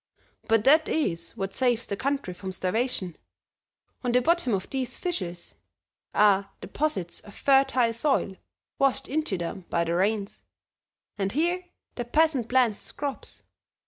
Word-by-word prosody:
But 225 -1 +3
that 310 +5 +5
is 170 - -1
what 195 0 -3
saves 245 -3 +1
the 200 - -3
country 275 -5 -2
from 190 +1 -6
starvation; 185 -1 -1 0.9
on 245 -1 0
the 250 - +5
bottom 340 -3 +2
of 190 - -4
these 255 -2 -3
fissures 180 - -4 0.6
are 200 -1 +4
deposits 190 - -2
of 205 - -14
fertile 270 -4 +3
soil 235 -5 +1 0.4
washed 275 -1 +2
into 295 -9 -1
them 175 +2 -5
by 170 - +1
the 170 0 -1
rains, 200 +3 0 0.8
and 195 0 0
here 345 - 0 0.3
the 240 - -4
peasant 285 -2 +2
plants 245 -5 +3
his - - -6
crops. 285 -2 -4
235 Hz, 145 wpm, -27 LUFS, 195-275 Hz, 0.9 s, that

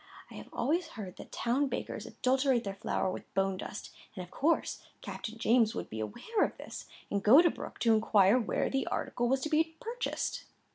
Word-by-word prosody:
I - - -10
have - - -9
always 330 +4 0
heard 190 -4 -7
that - - -11
town 265 +5 +1
bakers - - -4
adulterate 260 -1 +1
their 195 - -3
flour 195 -1 -1
with - - -8
bone 195 -1 +1
dust; 200 - -7 0.2
and, 185 - -5
of 175 - -13
course, 320 +5 +1 0.2
Captain 225 +1 -6
James 225 -1 +3
would - - -5
be 110 - -5
aware 255 - -1
of - - -2
this, - - -8 0.2
and 200 - 0
go 230 +9 +8
to 340 -1 +5
Brooke - - -8
to 225 0 +5
inquire 215 0 +5
where 225 - 0
the 270 0 -1
article 240 0 -1
was 265 +1 +2
to 310 - -2
be 320 +1 +2
purchased." 485 0 -3
240 Hz, 200 wpm, -31 LUFS, 200-290 Hz, 0.2 s, go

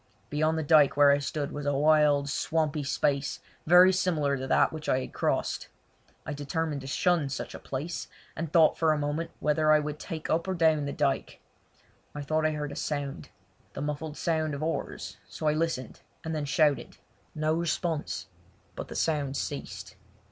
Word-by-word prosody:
Beyond 155 +2 +1
the 160 - -1
dyke 145 -2 +5
where 145 -1 +7
I 140 - +3
stood 145 0 -3
was 145 -1 -5
a 145 - +1
wild, 150 -1 +4
swampy 155 0 0
space 140 0 0 0.3
very 180 +3 +8
similar 155 -6 +1
to 130 0 -4
that - - +3
which 155 -1 -5
I 130 - +2
had - - -8
crossed. - - -1 0.6
I 155 - -4
determined 145 +1 -2
to 135 - -8
shun 165 0 +1
such 135 - -5
a - - -8
place, 150 +6 -5 0.3
and 165 -1 -4
thought 160 -2 +5
for 160 -2 +4
a - - -1
moment 150 +3 -2
whether 155 +1 +2
I 155 - +7
would 150 0 -3
take 160 -4 -6
up 165 +3 0
or 190 - -1
down 160 -3 +3
the 140 - -3
dyke. 140 -2 -1 0.8
I 145 - -4
thought 155 +2 +1
I - - 0
heard 150 -1 -4
a - - -7
sound—the 140 -1 -6
muffled 150 +1 -4
sound 155 -3 0
of 140 - -5
oars, 165 - -4
so - - -7
I 150 - +4
listened, 155 -5 -2 0.2
and 160 - -2
then 150 -2 -2
shouted. 145 0 +1 0.4
No 155 0 +1
response; 165 -1 -2 0.5
but - - -6
the - - -8
sound 145 -4 0
ceased. - - -6
150 Hz, 185 wpm, -28 LUFS, 145-160 Hz, 0.8 s, very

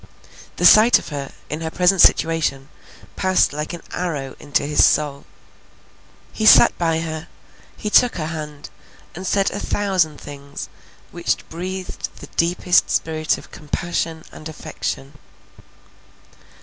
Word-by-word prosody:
The - - 0
sight 220 +3 +8
of - - -9
her, 140 -2 -5 0.2
in 150 +2 -5
her 160 - -3
present 180 +2 +3
situation, 155 -4 +2 0.5
passed 185 -5 +2
like 150 +1 -4
an 175 -2 -8
arrow 150 -7 -4
into 145 -1 -1
his 150 +1 +3
soul. 145 -2 +1 1.1
He 220 - 0
sat - - +8
by 165 -2 +1
her, 160 0 -5 0.5
he 210 - -4
took 245 +2 +5
her 160 -3 -3
hand, 150 -2 -7 0.4
and 185 +2 -7
said 195 0 +1
a 205 - -4
thousand 185 -9 0
things 140 0 -9 0.4
which - - -2
breathed 185 +2 -5
the - - -11
deepest 175 +1 +2
spirit 155 -1 0
of - - -14
compassion 160 +1 -3
and 155 - -9
affection. 140 -2 -6
160 Hz, 135 wpm, -21 LUFS, 150-180 Hz, 1.1 s, sight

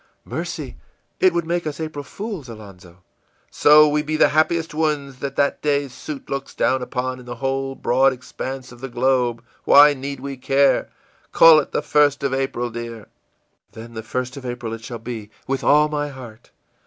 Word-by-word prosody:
î - - -11
ìMercy, - - -4 0.5
it 185 - +5
would 170 -1 -1
make 170 0 -2
us 150 0 -5
April 155 -2 -5
fools, 195 - -7
Alonzo!î 100 -5 -12 0.5
ìSo 150 0 +6
we 150 0 +1
be 155 +1 -2
the - - +5
happiest 160 +1 +1
ones 150 -4 -2
that 140 -1 -5
that 140 - +1
day's 145 -3 0
suit 145 +1 -8
looks 140 0 -5
down 130 +2 +1
upon 130 0 -3
in 125 - -14
the 120 - -6
whole 135 +2 -2
broad 135 +2 +3
expanse 130 0 -7
of 120 -1 -14
the 135 - -5
globe, 120 -1 0 0.2
why 145 +1 +7
need 140 0 -6
we 135 0 -6
care? 135 +2 +2 0.4
Call 165 -2 +8
it 145 - -4
the - - -1
1st 145 -2 +2
of 135 -1 0
April, 135 -3 -2
dear.î 115 -2 -7 0.7
ìThen 115 +1 -10
the 110 - -5
1st 125 +4 -4
of 135 - -8
April 120 -2 -5
at 115 0 -8
shall 120 0 -6
be, 115 -2 -7 0.2
with 135 -1 -2
all 150 +1 +5
my 145 -1 -2
heart! 125 -5 -11
135 Hz, 190 wpm, -21 LUFS, 120-150 Hz, 0.7 s, Call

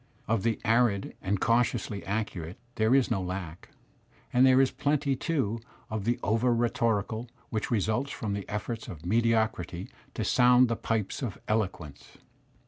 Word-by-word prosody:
'* - - -34
Of 110 -2 +1
the 115 0 0
arid 115 -3 +2
and 100 +1 -1
cautiously 115 -3 +1
accurate 100 -3 -3 0.2
there 110 +3 +3
is 135 -2 +3
no 95 - +1
lack, 90 -2 -6 0.6
and 125 +2 +6
there 130 0 +6
is 135 -1 +4
plenty, 145 -1 0
too, 130 -7 -1 0.3
of 110 -2 -3
the 120 +1 +1
over 115 +4 +2
rhetorical 115 -1 0 0.2
which 110 -2 -2
results 110 +4 0
from 110 -7 -3
the 100 -1 -5
efforts 110 +2 -4
of 80 -1 -9
mediocrity 110 -4 0 0.2
to - - -1
sound 125 0 +5
the 115 - +1
pipes 110 0 -2
of 120 -8 -3
eloquence. 95 -9 -3
110 Hz, 155 wpm, -28 LUFS, 100-120 Hz, 0.6 s, and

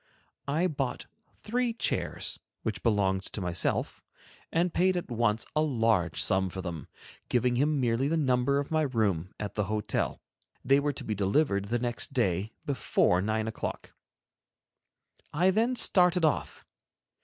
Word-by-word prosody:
I 155 +5 +1
bought 140 -7 -2 0.3
three 240 +2 -1
chairs 230 - -2 0.2
which - - -3
belonged 100 -4 +2
to - - -4
myself, 90 -2 -1 0.5
and 170 +1 +1
paid 185 0 +2
at 175 - -5
once 115 -2 +1
a 155 - +3
large 115 - +1
sum 95 0 +2
for 95 - -7
them, 85 -4 -5 0.4
giving 125 0 +2
him 145 +3 +2
merely 120 +1 +1
the 165 +3 +1
number 130 -1 +2
of 140 +1 -3
my 155 0 +2
room 105 - 0
at 105 -1 -4
the 105 - -1
hotel. 105 +1 -2 0.5
They 135 +2 +5
were 145 0 0
to - - -7
be 110 - -2
delivered 100 +1 +1
the 115 +4 0
next 120 +2 -2
day 105 - 0
before 115 -8 +2
nine 110 +2 -1
o'clock. 110 - -5 1.4
I 180 +5 +3
then 230 +6 +1
started 180 -6 +4
off. 155 - -1
125 Hz, 150 wpm, -29 LUFS, 105-155 Hz, 1.4 s, They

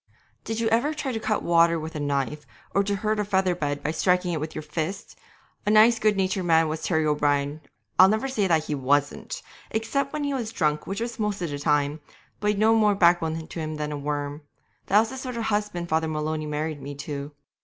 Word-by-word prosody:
Did 225 0 -3
you 230 - +1
ever 255 +8 +1
try 280 -3 -3
to 225 - -2
cut 215 -1 -1
water 170 -1 +4
with 160 +1 -6
a 155 - -4
knife, 145 +1 -2 0.3
or 200 - +3
to 200 0 -1
hurt 215 +1 -1
a - - +2
feather 190 -2 +1
bed 145 -4 -3
by 150 - 0
striking 180 +2 +1
at - - -1
it - - -3
with 155 +1 -5
your 155 - -4
fist? 160 +6 -4 0.5
A - - -1
nice 220 +2 +6
good 215 -3 +2
natured 190 -1 0
man 165 -1 +4
was 155 +1 -3
Terry 160 -3 +1
O'Brien 145 0 +1 0.4
I'll 185 +1 +9
never 220 +5 0
say 220 -7 0
that 160 -3 +3
he 150 - -3
wasn't 145 +1 0
that, - - -5 0.3
except 275 +5 -1
when 300 -1 -3
he 285 -1 -1
was 235 -5 -3
drunk, 150 -8 0
which 195 +3 -3
was 235 -1 -4
most 210 -3 -1
of 165 - -3
the 145 - -4
time 145 0 +1 0.4
but 210 - -2
he'd 210 -1 +2
no 220 +2 +4
more 210 -2 +4
backbone 165 -3 +3
to - - -7
him 155 -1 -3
than 150 0 -3
a - - -3
worm. 145 0 -3 0.5
That 205 +3 +6
was 225 - -2
the 265 - -6
sort 255 -2 -5
of 230 - -2
husband 205 -5 -1
Father 160 0 +1
Maloney 155 0 -2
married 150 0 -3
me 145 +1 -7
to. 140 0 -6
170 Hz, 240 wpm, -25 LUFS, 150-210 Hz, 0.5 s, I'll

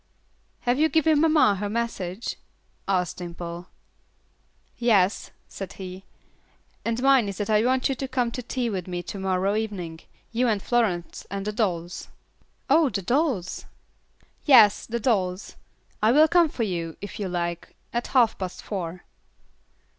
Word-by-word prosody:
"Have 245 +2 +1
you 315 +1 +4
given 315 -2 +3
mamma 310 -11 +4
her 205 +1 -3
message?" 215 -3 -3 0.5
asked 180 -3 0
Dimple. 175 0 -7 1.1
"Yes," 205 -5 +2 0.2
said 195 -2 -7
he, 185 0 -8 0.8
"and 230 +2 -2
mine 270 -6 +5
is 195 - -6
that 210 +1 -2
I 215 0 +4
want 255 +1 +2
you 270 - 0
to 270 +1 -4
come 250 -3 0
to 250 - -5
tea 245 0 -2
with 190 -5 -3
me 175 -1 -4
to 200 - -7
morrow 190 +1 0
evening, 190 -7 -4 0.3
you 245 +2 +1
and 215 -3 +1
Florence 200 -6 -1
and 195 0 -4
the 210 - -1
dolls." 175 -5 -2 0.6
"Oh, 320 -3 +4
the 200 -5 -3
dolls?" 245 - -1 0.8
"Yes, 225 -8 +6
the 235 +1 -2
dolls. 195 -6 -1 0.5
I 215 - +4
will 305 +5 +6
come 340 0 +4
for 240 - -3
you, 170 -5 -3
if 205 - -8
you 200 - -2
like, 170 -1 -3 0.2
at 240 0 -1
half 240 -4 +3
past 185 -2 -5
four." 180 -3 -5
210 Hz, 155 wpm, -25 LUFS, 185-245 Hz, 1.1 s, Yes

